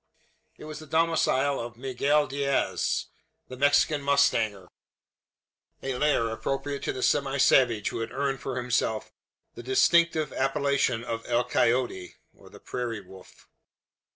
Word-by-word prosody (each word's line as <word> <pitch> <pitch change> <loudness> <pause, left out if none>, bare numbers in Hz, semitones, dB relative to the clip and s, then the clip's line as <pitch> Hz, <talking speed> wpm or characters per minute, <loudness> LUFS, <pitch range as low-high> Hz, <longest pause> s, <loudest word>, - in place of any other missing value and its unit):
It - - -11
was 155 -1 -7
the 155 - -12
domicile 145 -4 +1
of 115 -1 -7
Miguel 140 +4 +1
Diaz, 140 0 -1 0.4
the 130 - -7
Mexican 145 +2 +3
mustanger 125 -9 +1 1.2
a 135 -1 -2
lair 125 -5 +1
appropriate 135 +4 -3
to - - 0
the 130 - -5
semi 140 -1 +1
savage 125 -5 +3
who - - -5
had 115 0 -4
earned 135 0 -2
for 130 -2 -5
himself 120 -3 -1 0.4
the - - -9
distinctive 155 +4 +2
appellation 135 -3 0
of 115 -1 -4
El 120 0 +2
Coyote 115 -8 0 0.5
("Prairie 120 -4 -4
Wolf.") 95 0 -16
135 Hz, 125 wpm, -27 LUFS, 120-140 Hz, 1.2 s, Mexican